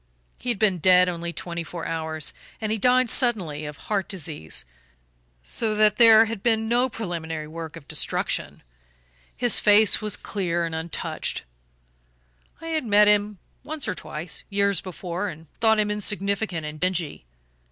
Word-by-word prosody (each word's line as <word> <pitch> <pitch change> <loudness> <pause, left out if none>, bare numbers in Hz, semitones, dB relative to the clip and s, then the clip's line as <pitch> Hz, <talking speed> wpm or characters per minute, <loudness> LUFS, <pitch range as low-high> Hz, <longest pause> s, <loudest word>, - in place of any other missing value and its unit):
He 250 - -4
had 240 - 0
been 195 -4 +2
dead 180 +1 +6
only 170 -1 -3
twenty 170 0 -5
four 165 0 -7
hours, 160 -2 -2 0.3
and 215 -1 -2
he 220 - 0
died 250 +3 +4
suddenly, 190 - +1
of 150 -1 -7
heart 200 -3 -2
disease, 150 - -4 0.8
so 215 - -1
that 210 -1 +4
there 225 -1 +8
had 220 -3 -5
been 225 -1 +1
no 245 +3 +2
preliminary 165 -8 -5
work 160 0 -7
of 155 -5 -12
destruction - - -1 0.7
his 245 -2 +3
face 210 0 +5
was 210 -1 -1
clear 175 -4 -2
and 165 - -5
untouched. 160 +1 -3 1.2
I 330 - -6
had 315 -2 0
met 210 -2 +5
him 210 0 +2 0.3
once 300 +1 -5
or - - 0
twice, 155 +2 -6
years 200 -1 +2
before, 185 +1 -4
and 160 -1 -10
thought 220 -1 +4
him 210 -1 +1
insignificant 200 -4 -1
and 150 0 -7
dingy. 175 - -1
195 Hz, 155 wpm, -24 LUFS, 165-220 Hz, 1.2 s, there